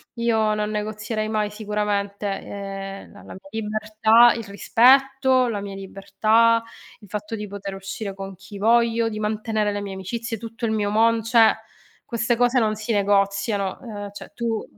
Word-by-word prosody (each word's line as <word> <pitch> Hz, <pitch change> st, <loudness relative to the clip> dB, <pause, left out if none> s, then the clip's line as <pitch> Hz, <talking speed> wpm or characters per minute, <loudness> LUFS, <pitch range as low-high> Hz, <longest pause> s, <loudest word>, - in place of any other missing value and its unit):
io 220 Hz, -2 st, +1 dB
non 210 Hz, 0 st, -1 dB
negozierei 215 Hz, +1 st, -3 dB
mai 215 Hz, -1 st, 0 dB
sicuramente, 210 Hz, -1 st, -2 dB
ehm, 195 Hz, 0 st, -6 dB
la 205 Hz, -, -14 dB
la -, -, -10 dB
mia 190 Hz, -, -14 dB
libertà 215 Hz, +2 st, +4 dB
il 230 Hz, -, -5 dB
rispetto, 260 Hz, +4 st, +4 dB
la 210 Hz, -3 st, -3 dB
mia 200 Hz, -1 st, -6 dB
libertà, 220 Hz, +4 st, +2 dB, 0.4 s
il 205 Hz, -, -16 dB
fatto 210 Hz, +2 st, -5 dB
di 210 Hz, -1 st, -6 dB
poter 200 Hz, 0 st, -6 dB
uscire 195 Hz, +1 st, -6 dB
con 195 Hz, -1 st, -7 dB
chi 200 Hz, +2 st, -11 dB
voglio, 230 Hz, +1 st, +3 dB
di 215 Hz, -1 st, -5 dB
mantenere 215 Hz, 0 st, -1 dB
le 205 Hz, 0 st, -3 dB
mie 200 Hz, -1 st, -6 dB
amicizie, 225 Hz, +5 st, -4 dB
tutto 230 Hz, +2 st, -6 dB
il 220 Hz, -, 0 dB
mio 210 Hz, -2 st, 0 dB
mon 225 Hz, +1 st, +3 dB
cioè 230 Hz, -1 st, +5 dB, 0.5 s
queste 235 Hz, 0 st, 0 dB
cose 245 Hz, +2 st, +3 dB
non 215 Hz, -2 st, +1 dB
si 215 Hz, +2 st, -3 dB
negoziano; 200 Hz, -1 st, +1 dB
ehm, 205 Hz, -4 st, -7 dB
cioè 205 Hz, -, -11 dB
tu 230 Hz, -2 st, -2 dB
215 Hz, 165 wpm, -23 LUFS, 200-230 Hz, 0.5 s, cioè